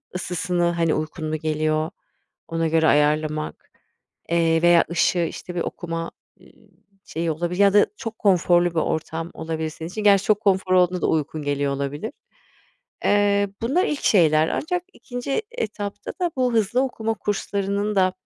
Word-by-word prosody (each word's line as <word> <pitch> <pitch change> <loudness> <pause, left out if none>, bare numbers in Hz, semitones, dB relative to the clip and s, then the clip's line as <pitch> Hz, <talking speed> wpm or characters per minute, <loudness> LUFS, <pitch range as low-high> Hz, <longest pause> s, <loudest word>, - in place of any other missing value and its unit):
ısısını, 180 0 -1
hani, 165 -2 +1
uykun 155 +1 -3
mu 155 - -1
geliyor, 155 0 0 0.6
ona 165 0 -1
göre 160 0 +3
ayarlamak, 150 +1 0 0.6
eee, 165 -1 +2
veya 175 0 +5
ışığı, 170 +1 +2
işte, 180 - -8
bir 175 - -1
okuma, 165 -1 -4 0.3
ııı, - - -18 0.6
şeyi, 165 0 -2
olabilir 175 +4 -3
ya 200 -1 +5
da 205 - +5
çok 225 -1 -6
konforlu 175 -3 +3
bir - - -18
ortam 160 +1 -2
olabilir 160 0 -3
senin 160 +1 -8
için. 210 +3 -5
Gerçi 200 -1 +5
çok 210 -1 +3
konfor 190 -3 +2
olduğunda 180 -1 +3
da - - +1
uykun 155 0 -1
geliyor 145 -1 0
olabilir. 140 +9 -4 0.9
Eee, 205 0 +3
bunlar 275 +11 +2
ilk 295 - -3
şeyler 160 -5 +4
ancak 360 +4 -2
2'nci 245 - -4
etapta 210 - -5
da 350 -1 +1
bu 250 -2 +1
hızlı 225 +3 +2
okuma 225 -4 -2
kurslarının 200 0 -2
da, 185 -1 +3
175 Hz, 155 wpm, -23 LUFS, 160-205 Hz, 0.9 s, veya